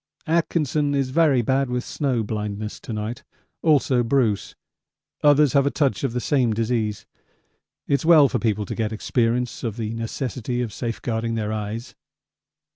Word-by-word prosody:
Atkinson 155 -3 +1
is 135 -2 0
very 145 -5 +3
bad 135 +2 +1
with 125 0 -1
snow 130 -6 -1
blindness 105 0 -4
to - - -9
night; 110 +2 -4 0.4
also 140 -5 +3
Bruce. 115 -4 0 0.7
Others 145 -1 +5
have 140 -1 +4
a - - +4
touch 140 -2 0
of 135 -4 -1
the 125 - -1
same 125 -4 +1
disease. 110 -2 -1 0.8
It's 140 -2 +1
well 160 -3 +7
for - - -1
people 105 -3 0
to - - -5
get 110 -2 -2
experience 120 +2 -1
of 115 -2 -3
the 110 -1 -3
necessity 120 +1 -3
of 115 - -5
safeguarding 115 -1 -3
their 110 -1 -2
eyes. 110 +3 -5
120 Hz, 155 wpm, -23 LUFS, 110-140 Hz, 0.8 s, well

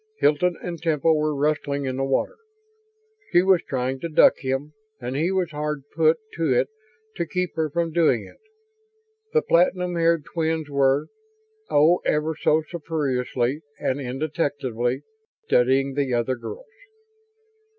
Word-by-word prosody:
Hilton 175 - +2
and 170 -2 -5
Temple 160 -1 +2
were 150 0 0
wrestling 145 -1 0
in 130 -1 -2
the 135 - 0
water 135 - 0 0.9
she 175 - +5
was 190 -3 +4
trying 130 0 -2
to 170 - -4
duck 155 - +5
him 135 +3 -3 0.3
and 125 +2 -4
he 165 +6 +1
was 185 -3 0
hard 150 -1 -3
put 160 0 +4 0.2
to 165 -4 +1
it 125 +1 +2 0.5
to 170 - -2
keep 180 +3 -2
her 160 -1 0
from 170 +2 -1
doing 155 - +2
it. - - -16 0.9
The 465 - +2
platinum 180 +1 +2
haired 165 -3 +2
twins 160 -2 -2
were 140 0 +2 0.6
oh, 160 +5 +5
ever 155 +1 0
so 155 +2 +2
surreptitiously 140 -5 -2 0.2
and 135 +2 -1
indetectably! 135 -2 -2 0.4
studying 135 +2 +2
the 135 -3 0
other 120 +2 0
girls. 460 - -8
150 Hz, 140 wpm, -24 LUFS, 135-165 Hz, 0.9 s, she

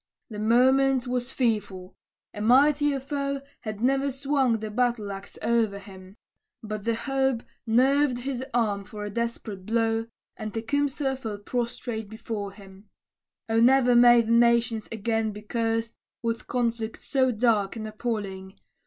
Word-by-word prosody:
The 210 - -6
moment 260 +3 +4
was 245 0 -2
fearful; 205 -8 -2 0.4
a 210 - -6
mightier 280 +4 +4
foe 280 0 -3 0.2
Had 215 -2 -6
ne'er 270 +3 +2
swung 270 -3 +1
the 215 -1 -6
battle 235 -3 0
axe 195 +1 -8
o'er 225 -4 +1
him; 190 -1 -13 0.5
But 215 0 -5
hope 265 +1 0 0.2
nerved 260 +3 +3
his 260 -1 -3
arm 215 -5 0
for 210 +1 -7
a 205 - -5
desperate 225 -3 -4
blow, 225 0 +1 0.3
And 215 0 -6
Tecumseh 275 +3 0
fell 220 -5 -5
prostrate 230 0 -4
before 220 -2 -5
him. 195 0 -15 0.6
O 225 0 +2
ne'er 250 +1 +5
may 240 0 +7
the 225 - -3
nations 235 -1 +3
again 225 0 -1
be 210 +1 -10
cursed 225 +1 -1 0.3
With 230 -1 -2
conflict 230 -2 -2
so 260 -2 +1
dark 220 -3 +1
and 220 -1 -5
appalling! 205 -4 -5
230 Hz, 140 wpm, -26 LUFS, 215-255 Hz, 0.6 s, may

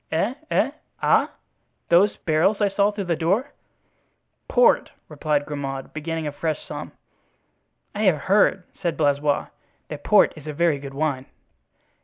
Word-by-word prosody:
"Eh? 165 +9 0 0.2
eh? - - +2 0.3
ah? - - +4 0.6
Those 185 +4 +4
barrels 165 +5 +1
I 205 -2 +2
saw 200 +1 +2
through 205 -1 -4
the 175 -2 0
door?" 195 - 0 1.0
"Port!" - - +4 0.2
replied 150 -2 -1
Grimaud, 135 -2 -5
beginning 160 +1 -4
a 150 - -2
fresh 155 +1 -3
sum. - - -7 1.0
"I 210 +1 -1
have 160 -7 +3
heard," 195 0 +3 0.2
said 170 -3 -1
Blaisois, 145 -1 +1 0.4
"that - - -7
port - - +5
is 155 -1 -12
a 150 - -4
very 160 -1 +1
good 135 0 -9
wine." 140 -3 -1
160 Hz, 145 wpm, -23 LUFS, 145-195 Hz, 1.0 s, port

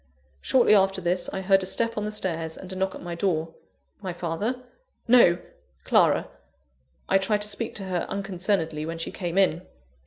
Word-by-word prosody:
Shortly 245 -4 +4
after 195 -1 +4
this, 175 0 -1
I 190 - -3
heard 195 0 +4
a 185 - -3
step 230 +4 -1
on 210 - -2
the 210 - -3
stairs 165 -6 -2
and 185 0 -8
a - - -6
knock 190 0 -1
at - - -10
my 175 0 -5
door. 165 -2 -1 0.5
My 185 -3 -4
father? 200 +9 -3 0.4
No! 230 -8 +6 0.5
Clara. - - +3 0.8
I 195 - +4
tried 205 +2 0
to - - -2
speak 215 +2 -4
to 200 - -5
her 185 -2 -2
unconcernedly, 185 -5 -1
when 165 0 -4
she 165 - -4
came 175 -1 -4
in. 180 -4 +3
190 Hz, 185 wpm, -26 LUFS, 170-205 Hz, 0.8 s, No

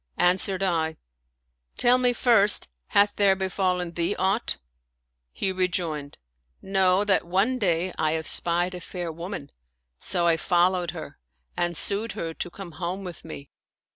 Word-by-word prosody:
" - - -41
Answered 190 +1 0
I, 160 -4 0 0.4
" 60 0 -48
Tell 245 +1 +4
me 250 -1 +4
first, 225 -4 +4 0.2
hath 205 0 +4
there 200 -2 +5
befallen 185 -2 -1
thee 170 +3 -1
aught? 195 +5 0 0.4
" 60 0 -54 0.3
He 190 - -1
rejoined: 170 -6 -2 0.4
Know 190 0 +2
that 200 -2 +3
one 205 +9 +1
day 180 -3 0
I 155 0 +1
espied 170 +3 0
a 180 - -7
fair 175 -1 -5
woman; 170 -3 -7 0.5
so 175 -2 +2
I 165 -1 +4
followed 175 +1 +2
her - - -8 0.4
and 175 -1 -1
sued 210 +6 0
her 165 -1 -4
to 175 - -4
come 185 0 -9
home 180 +4 -4
with 180 -3 -8
me. 145 -3 -10
180 Hz, 155 wpm, -25 LUFS, 165-195 Hz, 0.5 s, there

